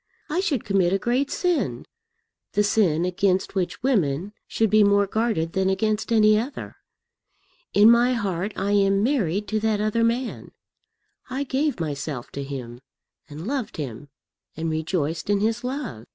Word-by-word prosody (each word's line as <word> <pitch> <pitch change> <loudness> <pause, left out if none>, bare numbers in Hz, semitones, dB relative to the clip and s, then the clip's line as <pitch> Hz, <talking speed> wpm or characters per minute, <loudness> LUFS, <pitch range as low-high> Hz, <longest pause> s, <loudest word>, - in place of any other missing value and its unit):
I 335 - +1
should 295 - 0
commit 190 -3 +2
a - - +3
great 245 +7 0
sin, 355 -3 -1 0.7
the 210 - +3
sin 180 -6 +2
against 185 +1 0
which 190 +3 -2
women 195 - 0
should 220 -2 0
be 215 0 +6
more 200 0 +4
guarded 200 -6 -1
than 190 0 +1
against 215 +3 0
any 215 -1 +5
other. 255 +6 -6 1.0
In 210 +3 +8
my 240 +2 +4
heart 200 -4 -2
I 200 - -1
am 200 0 +3
married 210 - 0
to 215 - 0
that 215 -1 0
other 215 +2 +1
man. 235 +2 -2 0.8
I 270 +2 -2
gave 280 -2 -1
myself 145 -4 -4
to 140 - -5
him, 125 -3 -7 0.5
and 150 +3 -8
loved 260 -1 -3
him, 140 -1 -6 0.5
and 160 0 -2
rejoiced 160 +1 -2
in 205 -1 +3
his 225 +3 0
love. 250 - -5
205 Hz, 155 wpm, -24 LUFS, 170-230 Hz, 1.0 s, In